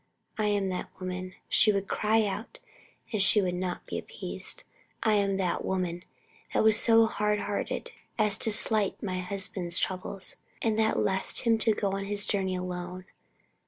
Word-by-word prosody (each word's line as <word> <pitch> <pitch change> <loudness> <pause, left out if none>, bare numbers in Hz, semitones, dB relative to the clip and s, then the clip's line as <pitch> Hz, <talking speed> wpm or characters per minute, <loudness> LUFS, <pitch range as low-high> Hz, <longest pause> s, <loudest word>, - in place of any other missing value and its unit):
I 215 -3 0
am 200 -2 +1
that 185 - -4
woman," 185 0 -5
she 215 - +5
would 200 -1 -1
cry 220 +1 +2
out 205 - -5 0.6
and 215 - +1
would 185 -4 +2
not 180 0 -3
be - - -4
appeased - - -2 0.4
"I 220 - +3
am 200 -2 +2
that 185 -2 -1
woman 180 -2 -2 0.5
that - - +4
was 220 -1 +6
so 225 -1 +6
hardhearted 210 - -2 0.3
as 210 -2 +4
to 220 - +2
slight 215 -1 +3
my 185 -3 -2
husband's 185 -2 -3
troubles, 185 0 -3 0.2
and 220 -1 0
that 220 0 +2
left 190 0 0
him 230 -2 +3
to 220 -1 +2
go 200 -2 -1
on 195 0 -3
his 205 0 -1
journey 190 -2 0
alone. 180 0 -5
195 Hz, 160 wpm, -29 LUFS, 185-215 Hz, 0.6 s, was